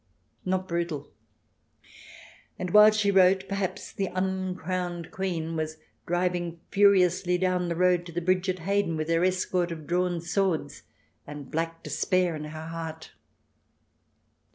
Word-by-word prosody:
Not 185 Hz, 0 st, -1 dB
brutal! 170 Hz, -4 st, -3 dB, 1.5 s
And 180 Hz, -1 st, -4 dB
while 210 Hz, +2 st, +9 dB
she 215 Hz, -1 st, +2 dB
wrote, 190 Hz, 0 st, +4 dB
perhaps 195 Hz, -2 st, -3 dB
the 195 Hz, -, -2 dB
uncrowned 185 Hz, -2 st, -3 dB
Queen 170 Hz, -4 st, -3 dB
was 155 Hz, 0 st, -3 dB, 0.3 s
driving 175 Hz, -1 st, -1 dB
furiously 185 Hz, -2 st, +4 dB
down 180 Hz, -1 st, 0 dB
the 170 Hz, -, -1 dB
road 180 Hz, 0 st, +2 dB
to -, -, -8 dB
the 170 Hz, -, -2 dB
bridge 185 Hz, +2 st, +1 dB
at 185 Hz, -, 0 dB
Hayden, 200 Hz, -4 st, +1 dB
with 155 Hz, +1 st, -3 dB
her 165 Hz, +1 st, +2 dB
escort 180 Hz, -1 st, 0 dB
of 160 Hz, -2 st, -7 dB
drawn 175 Hz, +1 st, 0 dB
swords, 170 Hz, -4 st, -1 dB, 0.5 s
and 145 Hz, -1 st, -9 dB
black 165 Hz, +1 st, -3 dB
despair 185 Hz, -3 st, +1 dB
in 150 Hz, 0 st, -6 dB
her 155 Hz, +1 st, -7 dB
heart 160 Hz, -1 st, -7 dB
180 Hz, 135 wpm, -27 LUFS, 165-185 Hz, 1.5 s, while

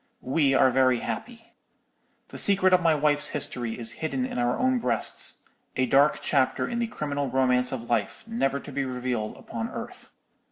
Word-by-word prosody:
"We 135 Hz, +1 st, +2 dB
are 130 Hz, -, +5 dB
very 130 Hz, -1 st, +3 dB
happy. 230 Hz, -1 st, -7 dB, 0.8 s
The -, -, -2 dB
secret 190 Hz, -2 st, +6 dB
of 180 Hz, -, +5 dB
my 165 Hz, -2 st, +3 dB
wife's 150 Hz, 0 st, +2 dB
history 120 Hz, -5 st, -4 dB
is 115 Hz, -2 st, -3 dB
hidden 135 Hz, -5 st, -1 dB
in 125 Hz, -, -4 dB
our 120 Hz, 0 st, +1 dB
own 255 Hz, 0 st, +2 dB
breasts—a 125 Hz, -, -2 dB
dark 140 Hz, +4 st, +3 dB
chapter 135 Hz, -3 st, +1 dB
in 235 Hz, -, -3 dB
the 235 Hz, -, 0 dB
criminal 145 Hz, -8 st, -3 dB
romance 125 Hz, -1 st, +2 dB
of 120 Hz, -3 st, -5 dB
life, 120 Hz, -, -1 dB
never 225 Hz, -12 st, -1 dB
to 145 Hz, -, -10 dB
be 135 Hz, 0 st, -2 dB
revealed 125 Hz, -4 st, -3 dB
upon 115 Hz, 0 st, -5 dB
earth. -, -, -8 dB
135 Hz, 170 wpm, -26 LUFS, 125-160 Hz, 0.8 s, secret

